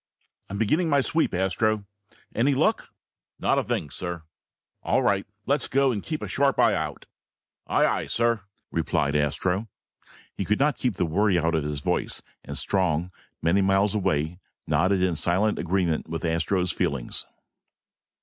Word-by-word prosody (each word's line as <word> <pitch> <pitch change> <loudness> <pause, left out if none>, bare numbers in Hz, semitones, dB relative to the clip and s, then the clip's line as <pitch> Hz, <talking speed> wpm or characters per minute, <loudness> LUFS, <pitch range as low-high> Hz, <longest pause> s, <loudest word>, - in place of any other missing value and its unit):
"I'm 100 - -4
beginning 155 - +2
my 140 -2 +4
sweep, 160 +4 +1
Astro. 100 +3 0 0.5
Any 135 +4 +2
luck?" - - +1 0.5
"Not - - +2
a - - -1
thing, 75 - -2
sir." 85 -2 -5 0.6
"All - - +1
right. 100 -1 +1 0.2
Let's 140 -1 +1
go, 135 0 +3
and 105 -4 -2
keep 155 +5 -4
a - - -3
sharp 140 0 +1
eye - - +5
out." - - -3 0.6
"Aye, - - +3
aye, - - 0
sir," 115 -2 +1 0.3
replied 70 +1 0
Astro. 90 +8 0 0.7
He - - -3
could 105 +2 0
not 145 0 +3
keep 125 -6 0
the 90 - 0
worry 95 +3 +2
out 85 0 +1
of 80 -2 +1
his 75 -1 -3
voice, - - -1 0.2
and - - -4
Strong, 90 -3 +1 0.3
many 85 +5 +3
miles 95 +2 +3
away, 80 -4 0 0.3
nodded 90 +6 +2
in 90 -2 +2
silent 95 +7 +1
agreement 85 -3 0
with 80 +1 -3
Astro's 85 +2 +1
feelings. 65 -4 -2
95 Hz, 160 wpm, -26 LUFS, 85-110 Hz, 0.7 s, eye